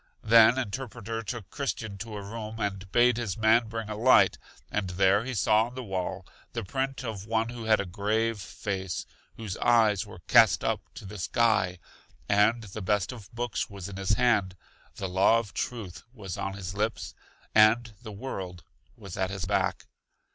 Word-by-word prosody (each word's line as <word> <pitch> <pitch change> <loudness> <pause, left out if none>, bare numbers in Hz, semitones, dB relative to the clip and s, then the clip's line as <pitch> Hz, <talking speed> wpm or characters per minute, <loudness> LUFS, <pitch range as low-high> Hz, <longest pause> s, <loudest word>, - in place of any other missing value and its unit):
Then 115 +2 +7
Interpreter 115 -2 -4
took 110 -1 -6
Christian 110 -8 -4
to 110 0 -6
a 100 - -6
room, 110 +1 -7
and 100 -3 -3
bade 120 +1 +4
his 110 -6 -3
man 110 +1 +4
bring 115 0 -5
a 105 - -4
light, 120 +5 +5 0.3
and 100 -3 -1
there 95 +3 +3
he 130 0 -4
saw 110 +2 +3
on 125 - -12
the 130 - -5
wall 95 -2 -4 0.3
the 115 -2 -3
print 135 +5 -3
of 110 -4 -5
one 115 +1 0
who 120 -2 -7
had 110 -1 +4
a 100 - -1
grave 105 +4 -1
face, 95 -3 -4 0.3
whose 105 -5 -5
eyes 110 -5 +3
were - - -11
cast - - +6
up - - 0
to - - -9
the 100 +1 -8
sky, 95 -3 +2 0.5
and 105 +3 +3
the 110 +1 -7
best 100 +1 0
of 110 -4 -11
books 120 -4 -2
was 100 -2 -7
in 100 -1 -8
His 95 +2 +1
hand, 105 -6 +2 0.4
the 95 - -4
law 95 +5 +4
of 115 -3 -4
truth 105 -8 -4
was 100 -8 -7
on 95 - -3
His 95 -2 -6
lips, 105 +2 -2 0.4
and 110 +1 +5
the 110 -3 -8
world 95 -5 -6 0.3
was 95 -2 -9
at 95 -1 0
His 100 -2 -4
back. - - 0
110 Hz, 185 wpm, -28 LUFS, 95-115 Hz, 0.5 s, Then